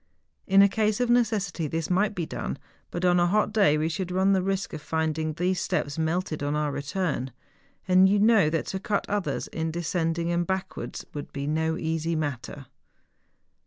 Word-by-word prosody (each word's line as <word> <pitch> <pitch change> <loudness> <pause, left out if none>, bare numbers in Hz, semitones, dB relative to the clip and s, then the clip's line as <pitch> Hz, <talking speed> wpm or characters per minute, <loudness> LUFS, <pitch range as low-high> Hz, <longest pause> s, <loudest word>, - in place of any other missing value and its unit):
In 195 +1 +7
a - - +7
case 215 +1 0
of 245 -1 +2
necessity 210 -9 +1
this 165 +3 -3
might 205 +3 +2
be 170 - -2
done; 65 - -4 0.3
but 175 +1 -3
on 175 0 +4
a 175 - +3
hot 210 +3 +1
day 195 -9 +4
we 155 +1 0
should 180 +2 -3
run 190 +2 +2
the 190 - +2
risk 195 +1 -2
of 155 - -5
finding 160 0 -1
these 180 +3 0
steps 145 +2 -2
melted 160 0 -1
on 145 +1 -1
our 150 -1 0
return. 145 -2 -2 0.6
And 185 +1 +6
you 205 - +3
know 205 -5 +5
that 160 0 -1
to 190 - -2
cut 200 +1 -1
others 205 -2 -1
in 160 0 -3
descending 170 0 -1
and 175 0 0
backwards 190 0 -4
would 145 - -6
be 140 0 -4
no 160 +2 0
easy 165 -1 -1
matter. 145 -2 -4
175 Hz, 190 wpm, -26 LUFS, 155-195 Hz, 0.6 s, In